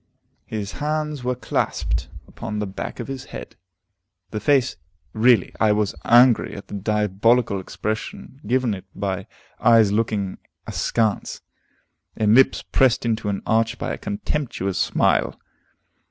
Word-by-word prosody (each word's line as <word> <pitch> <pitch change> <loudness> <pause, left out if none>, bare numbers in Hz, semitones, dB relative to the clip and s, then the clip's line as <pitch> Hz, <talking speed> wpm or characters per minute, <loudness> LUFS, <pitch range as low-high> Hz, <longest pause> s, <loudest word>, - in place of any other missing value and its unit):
His 105 -2 -4
hands 150 -1 -2
were 125 0 0
clasped 125 - -2 0.2
upon 105 - -6
the 105 - -1
back 95 -1 -6
of - - -5
his 135 -1 -6
head. - - -9 0.8
The 105 - -3
face 135 +2 +2 0.4
really, 115 -3 +4
I 110 -1 +4
was 105 -1 0
angry 120 0 +5
at 100 - -10
the - - -9
diabolical 105 +2 +1
expression 110 +7 -5
given 125 -1 +1
it 95 -1 -7
by 95 -2 -3 0.3
eyes 115 -3 +5
looking 105 -3 -1 0.3
askance, 110 -3 -1 0.7
and 105 -1 +3
lips 135 +2 +5
pressed 130 -3 +2
into 110 -2 0
an 100 - -3
arch 115 +1 +1
by - - -3
a - - -4
contemptuous 150 - -3
smile. - - +1
110 Hz, 135 wpm, -22 LUFS, 105-125 Hz, 0.8 s, angry